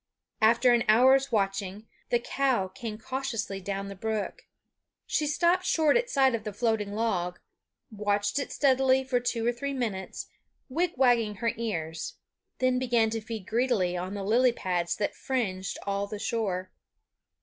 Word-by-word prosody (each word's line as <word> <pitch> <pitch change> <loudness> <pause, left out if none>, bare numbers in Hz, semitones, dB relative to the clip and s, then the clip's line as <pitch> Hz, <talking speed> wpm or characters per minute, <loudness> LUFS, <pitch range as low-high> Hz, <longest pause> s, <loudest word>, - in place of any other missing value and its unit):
After 235 +3 +5
an 235 -1 +3
hour's 260 +5 +5
watching, 195 0 -1 0.2
the 240 - +3
cow 240 -5 0
came 220 +1 -6
cautiously 225 -5 -3
down 195 +1 -3
the 200 - -6
brook. 215 +1 -4 0.6
She 300 - 0
stopped 345 +4 +2
short 315 -5 +3
at 485 0 +1
sight 265 - +3
of 225 -2 -2
the 210 - -4
floating 215 -2 0
log; 185 -5 -1 0.5
watched 205 +2 0
it 275 - -4
steadily 265 -1 +3
for 260 -1 +1
two 235 -2 -2
or 240 - +3
three 280 +4 -4
minutes, 210 -7 -3 0.4
wigwagging 255 -8 +2
her 230 +2 0
ears; 165 -8 -4 0.4
then 255 -1 +2
began 235 -3 +2
to 225 0 -2
feed 220 -3 -6
greedily 220 -6 +1
on 185 +3 -4
the 200 - -4
lily 240 +5 +4
pads 180 -6 -1
that 205 - -1
fringed 195 -8 -2
all 200 0 -1
the 210 - -5
shore. 190 -4 -2
225 Hz, 155 wpm, -28 LUFS, 200-255 Hz, 0.6 s, After